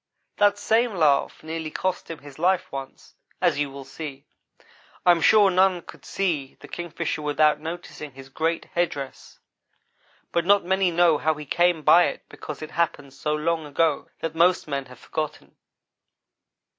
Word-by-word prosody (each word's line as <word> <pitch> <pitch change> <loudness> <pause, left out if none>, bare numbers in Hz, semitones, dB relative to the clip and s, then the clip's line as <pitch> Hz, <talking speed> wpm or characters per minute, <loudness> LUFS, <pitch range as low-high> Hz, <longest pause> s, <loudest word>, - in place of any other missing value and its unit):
That 205 0 +4
same 225 +1 +1
laugh 150 -5 +2
nearly 160 0 -4
cost 185 +3 -3
him 165 - -5
his 145 0 -14
life 185 +2 +1
once, 135 -1 -8 0.3
as - - +2
you 145 -1 0
will 135 0 -9
see. 140 -1 -8 0.8
I 180 - +8
am 170 -1 +2
sure 205 0 +6
none 185 -1 +3
could - - -14
see 160 -9 -2
the - - -12
Kingfisher 175 -2 -4
without 150 0 +2
noticing 160 -3 -7
his 135 0 -12
great 160 +4 -1
head 175 0 +2
dress, 135 -2 -8 0.9
but 170 - +1
not 200 +1 +4
many 190 0 +2
know 170 -3 +3
how 160 0 +1
he 150 0 -8
came 175 +1 +2
by 170 +4 +7
it - - -4
because 150 0 -8
it 155 - -8
happened 145 -5 -1
so 150 +2 -2
long 160 +1 0
ago 150 +1 0
that 165 -1 -3
most 175 +2 +3
men 140 -2 -3
have 125 -1 -13
forgotten. 155 +3 -5
160 Hz, 170 wpm, -24 LUFS, 145-175 Hz, 0.9 s, I